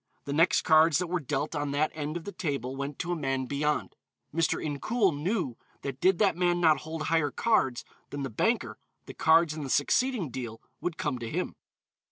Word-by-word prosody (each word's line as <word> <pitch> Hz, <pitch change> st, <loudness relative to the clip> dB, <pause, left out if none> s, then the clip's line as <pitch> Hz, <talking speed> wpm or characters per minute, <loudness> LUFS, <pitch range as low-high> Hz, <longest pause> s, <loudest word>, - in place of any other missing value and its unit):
The 140 Hz, -, -3 dB
next 165 Hz, +4 st, +4 dB
cards 160 Hz, -2 st, +5 dB
that 180 Hz, -, 0 dB
were 180 Hz, +1 st, -1 dB
dealt 145 Hz, +1 st, -2 dB
on 145 Hz, -1 st, -1 dB
that 150 Hz, +2 st, +1 dB
end 150 Hz, +1 st, -3 dB
of 170 Hz, -, -8 dB
the 205 Hz, -, -6 dB
table 140 Hz, -8 st, -3 dB
went 140 Hz, +1 st, -4 dB
to 175 Hz, -, -3 dB
a -, -, +1 dB
man 135 Hz, -4 st, -1 dB
beyond. 150 Hz, +3 st, -1 dB, 0.4 s
Mr. 165 Hz, 0 st, +1 dB
Incoul 180 Hz, -, 0 dB
knew 155 Hz, -, -1 dB, 0.3 s
that 135 Hz, -1 st, -5 dB
did 185 Hz, -1 st, +4 dB
that 195 Hz, -3 st, +3 dB
man 175 Hz, 0 st, +2 dB
not 160 Hz, -3 st, +4 dB
hold 160 Hz, 0 st, -5 dB
higher 160 Hz, -2 st, +2 dB
cards 135 Hz, -, +1 dB, 0.2 s
than 145 Hz, -1 st, -4 dB
the 135 Hz, -, -4 dB
banker -, -, 0 dB, 0.3 s
the -, -, -9 dB
cards 160 Hz, 0 st, +4 dB
in 155 Hz, -, -6 dB
the 135 Hz, -, -5 dB
succeeding 195 Hz, -, +1 dB
deal 115 Hz, -3 st, -6 dB, 0.2 s
would 175 Hz, -2 st, -3 dB
come 145 Hz, -5 st, -2 dB
to 115 Hz, -1 st, -5 dB
him. -, -, -3 dB
155 Hz, 205 wpm, -29 LUFS, 140-170 Hz, 0.4 s, cards